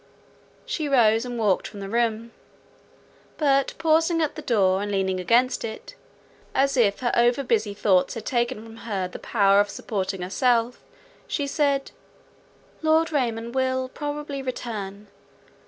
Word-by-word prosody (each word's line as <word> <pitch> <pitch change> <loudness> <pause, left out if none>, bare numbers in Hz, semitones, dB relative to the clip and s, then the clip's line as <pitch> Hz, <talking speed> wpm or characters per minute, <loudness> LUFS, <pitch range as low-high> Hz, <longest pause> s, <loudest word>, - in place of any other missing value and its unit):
She 330 -13 -3
rose, 230 -3 +4
and 245 -1 -5
walked 210 -5 +1
from 205 - -10
the 195 - -6
room; 230 +1 -1 1.1
but 275 -3 +2
pausing 325 +1 +2
at 310 -3 0
the 310 - -7
door, 195 -8 +2
and 205 0 -3
leaning 190 -1 0
against 240 +8 +2
it, 220 -1 -7 0.6
as 275 +1 +2
if 210 -4 +2
her 240 - +1
over 240 +3 +3
busy 215 -4 0
thoughts 190 -3 +2
had 230 - -7
taken 240 -2 -1
from 225 0 -12
her 200 -5 -3
the 180 - -9
power 200 -3 +3
of 205 0 +2
supporting 190 -3 -3
herself, 235 +5 +1 0.5
she 285 - -1
said, 280 -1 0 0.9
"Lord 320 +1 +3
Raymond 235 -5 -1
will 260 0 0
probably 290 -1 -5
return. 210 -6 -5
235 Hz, 145 wpm, -24 LUFS, 205-275 Hz, 1.1 s, rose